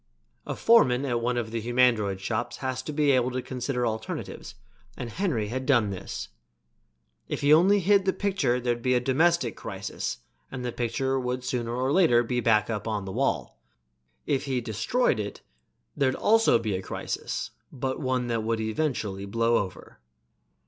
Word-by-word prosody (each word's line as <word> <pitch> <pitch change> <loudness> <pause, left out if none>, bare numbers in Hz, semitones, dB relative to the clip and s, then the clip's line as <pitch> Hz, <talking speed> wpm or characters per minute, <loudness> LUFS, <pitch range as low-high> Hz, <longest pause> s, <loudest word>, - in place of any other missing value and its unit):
A - - -3
foreman 140 - +4
at 120 -3 0
one 120 +1 0
of 115 -2 -2
the 115 0 -2
humandroid 115 -4 +2
shops 120 +4 -3
has 130 -1 -3
to 150 - -6
be 150 -1 +2
able 125 -1 +3
to 130 0 -3
consider 125 0 -2
alternatives 110 -1 -5 0.4
and 120 -2 -5
Henry 140 - -1
had 130 +3 -4
done 120 -8 +3
this. 95 0 -6 1.0
If - - -3
he 145 +1 +5
only 190 +6 +5
hid 195 +1 +4
the 190 - +3
picture 185 -13 0
there'd 120 -1 -1
be 125 +1 +2
a - - +4
domestic 135 - +2
crisis - - -5 0.3
and 125 -1 -5
the 120 - -2
picture 130 +3 -1
would 125 0 -3
sooner 120 -2 -2
or 130 +2 0
later 125 -10 +5
be 125 +1 -1
back 110 -3 +3
on 105 -2 -3
the 95 - -5
wall; - - -1 0.7
if 135 - 0
he 130 -2 0
destroyed 120 - 0
it 100 -1 -5 0.5
there'd 135 -2 +1
also 225 - +4
be 110 -4 -2
a 95 - -3
crisis, - - -4 0.2
but 130 0 -3
one 130 -3 0
that 115 -2 -1
would 115 +1 -1
eventually 110 -4 -2
blow 115 +3 +2
over. 95 -3 -5
125 Hz, 170 wpm, -27 LUFS, 115-135 Hz, 1.0 s, he